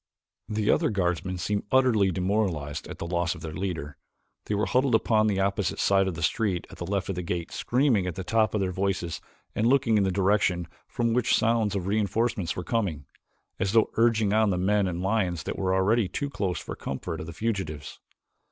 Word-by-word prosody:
The 105 Hz, -1 st, +1 dB
other -, -, +2 dB
guardsmen 95 Hz, -2 st, -1 dB
seemed 100 Hz, +3 st, -2 dB
utterly 125 Hz, -7 st, +4 dB
demoralized 90 Hz, -6 st, -1 dB
at -, -, -8 dB
the -, -, -5 dB
loss 85 Hz, 0 st, -1 dB
of -, -, -11 dB
their 80 Hz, -2 st, -6 dB
leader. 80 Hz, -5 st, -4 dB, 0.5 s
They 105 Hz, -, -1 dB
were 105 Hz, +1 st, +1 dB
huddled 130 Hz, -1 st, +2 dB
upon 110 Hz, -1 st, +3 dB
the 100 Hz, -2 st, 0 dB
opposite 100 Hz, -1 st, 0 dB
side 95 Hz, -1 st, +3 dB
of 95 Hz, -, -2 dB
the 85 Hz, -, -5 dB
street 95 Hz, +1 st, 0 dB
at -, -, -12 dB
the 85 Hz, -, -4 dB
left 100 Hz, 0 st, -1 dB
of -, -, 0 dB
the 90 Hz, -, -3 dB
gate, 85 Hz, -1 st, -4 dB
screaming 120 Hz, -7 st, +1 dB
at 90 Hz, -, -4 dB
the 95 Hz, -, -4 dB
tops 110 Hz, +2 st, +1 dB
of 105 Hz, -, +1 dB
their 95 Hz, -1 st, 0 dB
voices 95 Hz, -3 st, -2 dB, 0.3 s
and 110 Hz, -, +1 dB
looking 125 Hz, -4 st, +3 dB
in -, -, +3 dB
the 95 Hz, -, +1 dB
direction 95 Hz, -2 st, +1 dB, 0.2 s
from 115 Hz, -1 st, 0 dB
which 125 Hz, -1 st, +3 dB
sounds 115 Hz, -3 st, +1 dB
of 95 Hz, -3 st, -2 dB
reinforcements 105 Hz, -1 st, 0 dB
were 90 Hz, -, -4 dB
coming, 90 Hz, -10 st, -2 dB, 0.5 s
as 95 Hz, +1 st, 0 dB
though 115 Hz, -1 st, +4 dB
urging 110 Hz, -3 st, +3 dB
on 110 Hz, -1 st, +3 dB
the 90 Hz, -, 0 dB
men 100 Hz, +2 st, +2 dB
and 90 Hz, 0 st, -3 dB
lions 95 Hz, -5 st, 0 dB
that -, -, -4 dB
were 95 Hz, -1 st, +1 dB
already 105 Hz, +3 st, +2 dB
too 140 Hz, +8 st, -4 dB
close 100 Hz, -6 st, -2 dB
for -, -, -7 dB
the -, -, -7 dB
comfort 80 Hz, +5 st, -4 dB
of 80 Hz, -, -6 dB
the -, -, -6 dB
fugitives. 95 Hz, -7 st, -4 dB
100 Hz, 215 wpm, -27 LUFS, 90-110 Hz, 0.5 s, utterly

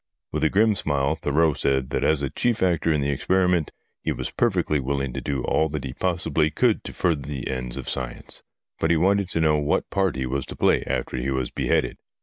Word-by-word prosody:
"With -, -, -2 dB
a 80 Hz, -, +4 dB
grim 110 Hz, +4 st, +4 dB
smile 70 Hz, -5 st, 0 dB
Thurreau 80 Hz, +1 st, +2 dB
said 65 Hz, -2 st, 0 dB
that -, -, 0 dB
as 75 Hz, -2 st, +2 dB
a 70 Hz, -, -2 dB
chief 115 Hz, +5 st, 0 dB
actor 85 Hz, -2 st, +2 dB
in 75 Hz, -2 st, +1 dB
the 70 Hz, +1 st, 0 dB
experiments, 90 Hz, +2 st, +1 dB, 0.3 s
he -, -, -1 dB
was -, -, -4 dB
perfectly 90 Hz, -9 st, +1 dB
willing 70 Hz, -1 st, -2 dB
to -, -, -4 dB
do 70 Hz, -3 st, -2 dB
all 80 Hz, 0 st, +1 dB
that 75 Hz, -2 st, -4 dB
he 65 Hz, -2 st, -5 dB
possibly 85 Hz, -2 st, 0 dB
could 110 Hz, +8 st, +1 dB
to -, -, -5 dB
further 85 Hz, -5 st, 0 dB
the 70 Hz, -3 st, -4 dB
ends 65 Hz, -2 st, -4 dB
of -, -, -6 dB
science. 60 Hz, -3 st, -3 dB, 0.4 s
But 80 Hz, -, +1 dB
he 85 Hz, -, +4 dB
wanted 95 Hz, +2 st, +2 dB
to 85 Hz, -, -1 dB
know 75 Hz, -1 st, +3 dB
what 75 Hz, -, 0 dB
part 95 Hz, -6 st, +1 dB
he 65 Hz, 0 st, -2 dB
was 65 Hz, +1 st, -2 dB
to -, -, -7 dB
play -, -, +3 dB
after -, -, -2 dB
he 65 Hz, +2 st, -2 dB
was 65 Hz, -2 st, -1 dB
beheaded. -, -, 0 dB
75 Hz, 225 wpm, -24 LUFS, 70-90 Hz, 0.4 s, a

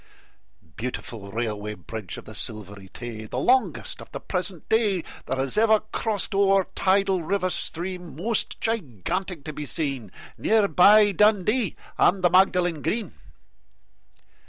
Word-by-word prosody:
Beautiful 115 Hz, -4 st, -6 dB
Railway 105 Hz, -1 st, -3 dB
Bridge 100 Hz, +1 st, -7 dB
of -, -, -10 dB
the -, -, -10 dB
Silvery 100 Hz, -2 st, -5 dB
Tay! 115 Hz, -1 st, -7 dB
The -, -, -5 dB
longest 255 Hz, +1 st, +1 dB
of -, -, -13 dB
the -, -, -5 dB
present 180 Hz, -2 st, -3 dB
day 210 Hz, -6 st, +2 dB, 0.2 s
That -, -, -1 dB
has 135 Hz, +8 st, +1 dB
ever 220 Hz, -1 st, +5 dB
crossed 215 Hz, -2 st, -1 dB
o'er 195 Hz, 0 st, +4 dB
a -, -, -24 dB
tidal 195 Hz, -1 st, +2 dB
river 185 Hz, +2 st, -1 dB
stream, 175 Hz, -1 st, -5 dB
Most 215 Hz, +8 st, -1 dB
gigantic 180 Hz, -, -3 dB
to 155 Hz, -, -6 dB
be 150 Hz, 0 st, -6 dB
seen, 135 Hz, -, -3 dB, 0.3 s
Near 220 Hz, -2 st, +3 dB
by 205 Hz, +3 st, +6 dB
Dundee 210 Hz, +3 st, +2 dB, 0.2 s
and 185 Hz, 0 st, +3 dB
the 175 Hz, -, +4 dB
Magdalen 180 Hz, -4 st, +3 dB
Green. 220 Hz, -, -2 dB
180 Hz, 140 wpm, -25 LUFS, 125-200 Hz, 0.3 s, by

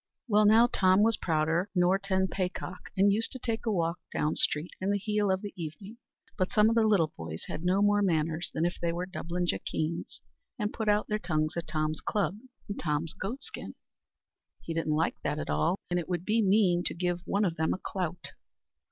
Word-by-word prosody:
Well, 210 Hz, -2 st, +5 dB
now, 225 Hz, +3 st, +7 dB
Tom 190 Hz, -4 st, +4 dB
was 225 Hz, 0 st, +4 dB
prouder 165 Hz, +3 st, 0 dB
nor 180 Hz, +2 st, +3 dB
ten 190 Hz, -1 st, +1 dB
paycock, 185 Hz, -1 st, -4 dB
and 200 Hz, +1 st, +5 dB
used 225 Hz, +2 st, +1 dB
to -, -, -5 dB
take 230 Hz, -2 st, -3 dB
a -, -, +3 dB
walk 170 Hz, -3 st, 0 dB
down 150 Hz, +1 st, 0 dB
street 150 Hz, +4 st, +1 dB
in 190 Hz, -, 0 dB
the 205 Hz, -, +2 dB
heel 210 Hz, 0 st, 0 dB
of 190 Hz, +1 st, 0 dB
the 205 Hz, -, -6 dB
evening; 185 Hz, +7 st, -7 dB, 0.4 s
but 185 Hz, -, +1 dB
some 215 Hz, +1 st, +5 dB
o' -, -, +2 dB
the 225 Hz, -1 st, +4 dB
little 175 Hz, -8 st, +3 dB
boys 80 Hz, 0 st, -6 dB
had 160 Hz, -, -5 dB
no 185 Hz, +3 st, +3 dB
more 205 Hz, 0 st, +4 dB
manners 165 Hz, -2 st, 0 dB
than 160 Hz, -, 0 dB
if 175 Hz, -, -2 dB
they 170 Hz, -, +1 dB
were 175 Hz, +2 st, -3 dB
Dublin 180 Hz, -1 st, -3 dB
jackeens, 165 Hz, -1 st, -2 dB, 0.4 s
and 210 Hz, -2 st, -2 dB
put 220 Hz, -2 st, -1 dB
out 210 Hz, 0 st, +2 dB
their 210 Hz, 0 st, -1 dB
tongues 155 Hz, -5 st, -1 dB
at 170 Hz, -1 st, -4 dB
Tom's 155 Hz, 0 st, -1 dB
club 200 Hz, -4 st, 0 dB, 0.3 s
and 200 Hz, -, -5 dB
Tom's 155 Hz, 0 st, -1 dB
goat 245 Hz, +9 st, -5 dB
skin. -, -, -7 dB, 0.9 s
He 165 Hz, -, -4 dB
didn't 165 Hz, -2 st, 0 dB
like 160 Hz, +2 st, 0 dB
that -, -, -1 dB
at 75 Hz, -, -3 dB
all, 75 Hz, -, +1 dB
and 175 Hz, -, +2 dB
it 170 Hz, -, -6 dB
would 175 Hz, -1 st, -2 dB
be 220 Hz, +2 st, +2 dB
mean 190 Hz, -3 st, +4 dB
to -, -, -1 dB
give 175 Hz, 0 st, -1 dB
one 205 Hz, +1 st, +2 dB
of 170 Hz, -3 st, -1 dB
them 160 Hz, 0 st, +1 dB
a -, -, 0 dB
clout. 180 Hz, -3 st, -4 dB
185 Hz, 215 wpm, -29 LUFS, 165-205 Hz, 0.9 s, now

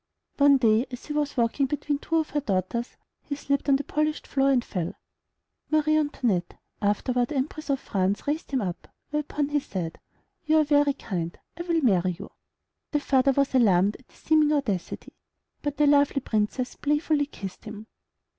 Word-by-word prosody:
One 280 Hz, -1 st, +7 dB
day 230 Hz, 0 st, +3 dB
as 250 Hz, -1 st, -8 dB
he 300 Hz, -, -5 dB
was 295 Hz, -2 st, -1 dB
walking 240 Hz, +4 st, +2 dB
between 290 Hz, +1 st, -2 dB
two 330 Hz, -, -3 dB
of 320 Hz, -1 st, +1 dB
her 295 Hz, -, +1 dB
daughters, 225 Hz, 0 st, -2 dB, 0.2 s
he 285 Hz, -, -5 dB
slipped 280 Hz, 0 st, -1 dB
on 275 Hz, -, +6 dB
the 280 Hz, -, -1 dB
polished 305 Hz, +2 st, -1 dB
floor 275 Hz, 0 st, +1 dB
and 255 Hz, -3 st, +2 dB
fell. 175 Hz, -3 st, -3 dB, 0.7 s
Marie 310 Hz, 0 st, +3 dB
Antoinette, 245 Hz, -, 0 dB, 0.2 s
afterward 240 Hz, +5 st, 0 dB
Empress 305 Hz, +2 st, -3 dB
of 275 Hz, -1 st, +1 dB
France, 195 Hz, -3 st, -1 dB
raised 300 Hz, +2 st, -2 dB
him 265 Hz, -3 st, 0 dB
up, 180 Hz, -3 st, -5 dB, 0.2 s
whereupon 300 Hz, -1 st, -1 dB
he 295 Hz, 0 st, +2 dB
said, 180 Hz, -, -5 dB, 0.4 s
"You 315 Hz, -1 st, +3 dB
are 310 Hz, -, +5 dB
very 290 Hz, -1 st, +3 dB
kind; 175 Hz, -, -4 dB, 0.2 s
I 340 Hz, -, -6 dB
will 340 Hz, -2 st, 0 dB
marry 185 Hz, -6 st, +2 dB
you." -, -, -9 dB, 0.6 s
The 295 Hz, -, +1 dB
father 275 Hz, -1 st, +3 dB
was 275 Hz, 0 st, +1 dB
alarmed 205 Hz, -5 st, +4 dB
at 255 Hz, -, -23 dB
this -, -, -24 dB
seeming 310 Hz, -1 st, +3 dB
audacity; 230 Hz, -, -2 dB, 0.5 s
but 290 Hz, -1 st, -3 dB
the 300 Hz, -, +4 dB
lovely 285 Hz, -1 st, +4 dB
Princess 220 Hz, +3 st, -1 dB
playfully 295 Hz, 0 st, 0 dB
kissed 195 Hz, -6 st, -9 dB
him. 215 Hz, 0 st, -8 dB
275 Hz, 175 wpm, -26 LUFS, 215-295 Hz, 0.7 s, One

